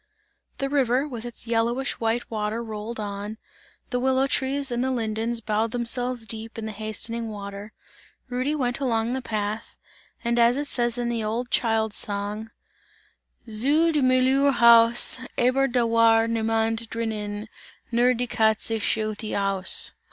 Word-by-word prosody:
The 275 Hz, -, -1 dB
river, 270 Hz, -1 st, +1 dB
with 240 Hz, -4 st, -7 dB
its 240 Hz, 0 st, -4 dB
yellowish 235 Hz, +3 st, -1 dB
white 230 Hz, +1 st, -1 dB
water 215 Hz, +1 st, -2 dB
rolled 220 Hz, +1 st, -6 dB
on; 205 Hz, +1 st, -5 dB, 0.5 s
the 250 Hz, -, 0 dB
willow 265 Hz, +1 st, +2 dB
trees 275 Hz, 0 st, -1 dB
and 240 Hz, +1 st, 0 dB
the 260 Hz, -, 0 dB
lindens 230 Hz, -1 st, -2 dB
bowed 215 Hz, +1 st, 0 dB
themselves 245 Hz, 0 st, 0 dB
deep 225 Hz, +1 st, -6 dB
in 225 Hz, -, -5 dB
the 220 Hz, -, -4 dB
hastening 220 Hz, +2 st, -4 dB
water; 200 Hz, 0 st, -8 dB, 0.6 s
Rudy 255 Hz, +4 st, -1 dB
went 245 Hz, -3 st, -1 dB
along 235 Hz, -3 st, 0 dB
the 260 Hz, -, -2 dB
path, 215 Hz, -1 st, -4 dB, 0.5 s
and 235 Hz, 0 st, +1 dB
as 235 Hz, +2 st, +4 dB
it 290 Hz, 0 st, -3 dB
says 240 Hz, -1 st, 0 dB
in 240 Hz, -1 st, -1 dB
the 230 Hz, -2 st, -1 dB
old 235 Hz, +3 st, -3 dB
child's 220 Hz, -2 st, +1 dB
song: 205 Hz, +2 st, -3 dB, 1.0 s
Zu 285 Hz, +10 st, +3 dB
des 300 Hz, -2 st, +1 dB
Müllers 260 Hz, +2 st, +3 dB
Haus, 235 Hz, +1 st, +6 dB, 0.2 s
Aber 255 Hz, +3 st, +3 dB
da 245 Hz, -1 st, +1 dB
war 230 Hz, 0 st, +4 dB
Niemand 225 Hz, 0 st, 0 dB
drinnen 215 Hz, -2 st, -4 dB, 0.4 s
Nur 245 Hz, +2 st, +3 dB
die 245 Hz, +2 st, -1 dB
Katze 220 Hz, -1 st, +1 dB
schaute 215 Hz, 0 st, -2 dB
aus! 195 Hz, -1 st, 0 dB
230 Hz, 150 wpm, -25 LUFS, 220-250 Hz, 1.0 s, Haus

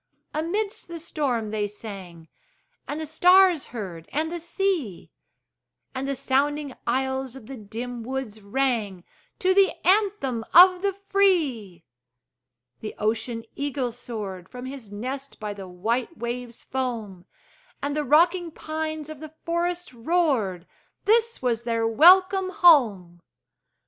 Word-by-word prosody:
Amidst 395 Hz, +8 st, -2 dB
the 340 Hz, 0 st, -7 dB
storm 270 Hz, -9 st, -2 dB
they 210 Hz, -1 st, -1 dB
sang, 195 Hz, -6 st, -10 dB, 0.6 s
And 295 Hz, -, -4 dB
the 315 Hz, -, -3 dB
stars 360 Hz, +1 st, +5 dB
heard, 180 Hz, -8 st, -7 dB
and 315 Hz, +2 st, -1 dB
the 345 Hz, -, -4 dB
sea; 340 Hz, -, -2 dB, 0.8 s
And 265 Hz, +1 st, -3 dB
the 275 Hz, -, -1 dB
sounding 285 Hz, +2 st, 0 dB
aisles 265 Hz, +1 st, -1 dB
of 265 Hz, -, -11 dB
the 270 Hz, -, -8 dB
dim 235 Hz, +2 st, -6 dB
woods 235 Hz, -3 st, -5 dB
rang 210 Hz, -4 st, -1 dB, 0.3 s
To 375 Hz, 0 st, +2 dB
the 390 Hz, 0 st, +4 dB
anthem 375 Hz, -, +2 dB
of 365 Hz, +1 st, +8 dB
the 400 Hz, 0 st, 0 dB, 0.2 s
free! 275 Hz, -, +1 dB, 1.0 s
The 215 Hz, -, -7 dB
ocean 225 Hz, +2 st, -1 dB
eagle 280 Hz, -3 st, -2 dB
soared 210 Hz, -7 st, -7 dB
From 250 Hz, 0 st, -8 dB
his 260 Hz, -6 st, -8 dB
nest 265 Hz, +6 st, -6 dB
by 210 Hz, -2 st, -4 dB
the 195 Hz, -2 st, -9 dB
white 230 Hz, -, -2 dB
wave's 240 Hz, 0 st, -5 dB
foam; 225 Hz, -8 st, -4 dB, 0.5 s
And 285 Hz, 0 st, -3 dB
the 300 Hz, -, 0 dB
rocking 340 Hz, +5 st, +3 dB
pines 310 Hz, -1 st, -5 dB
of 310 Hz, -2 st, -9 dB
the 310 Hz, 0 st, -10 dB
forest 345 Hz, -2 st, -2 dB
roared 235 Hz, -, 0 dB, 0.4 s
This 460 Hz, -, +2 dB
was 235 Hz, -2 st, +1 dB
their 230 Hz, -1 st, 0 dB
welcome 370 Hz, -, +6 dB
home! 215 Hz, -, +4 dB
265 Hz, 130 wpm, -25 LUFS, 220-335 Hz, 1.0 s, of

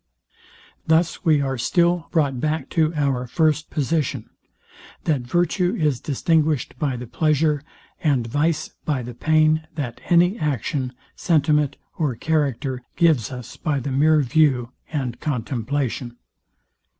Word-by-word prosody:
Thus 160 Hz, +3 st, +2 dB
we 155 Hz, -5 st, +4 dB
are 135 Hz, -2 st, -2 dB
still 170 Hz, +6 st, +2 dB
brought 140 Hz, -6 st, +1 dB
back 155 Hz, 0 st, -1 dB
to 160 Hz, -2 st, +2 dB
our 135 Hz, -4 st, 0 dB
first 155 Hz, +4 st, +1 dB
position, 140 Hz, -5 st, -1 dB, 0.7 s
that 150 Hz, -5 st, +1 dB
virtue 175 Hz, +7 st, +1 dB
is 150 Hz, -7 st, +1 dB
distinguished 155 Hz, -1 st, +1 dB
by 145 Hz, -5 st, 0 dB
the 125 Hz, -, -6 dB
pleasure, 150 Hz, +3 st, +1 dB, 0.4 s
and 140 Hz, -7 st, +2 dB
vice 150 Hz, +7 st, 0 dB
by 140 Hz, -5 st, -1 dB
the 120 Hz, +1 st, -7 dB
pain, 155 Hz, +3 st, +2 dB
that 135 Hz, -7 st, -5 dB
any 180 Hz, +5 st, +4 dB
action, 135 Hz, -2 st, -2 dB, 0.2 s
sentiment 150 Hz, -4 st, +2 dB, 0.2 s
or 145 Hz, -7 st, 0 dB
character 140 Hz, -3 st, -1 dB
gives 160 Hz, -10 st, +3 dB
us 125 Hz, -3 st, -8 dB
by 150 Hz, -4 st, -1 dB
the 135 Hz, +2 st, -4 dB
mere 150 Hz, +3 st, +4 dB
view 130 Hz, -3 st, +2 dB, 0.2 s
and 130 Hz, -6 st, -3 dB
contemplation. 125 Hz, -2 st, -2 dB
150 Hz, 125 wpm, -22 LUFS, 130-160 Hz, 0.7 s, we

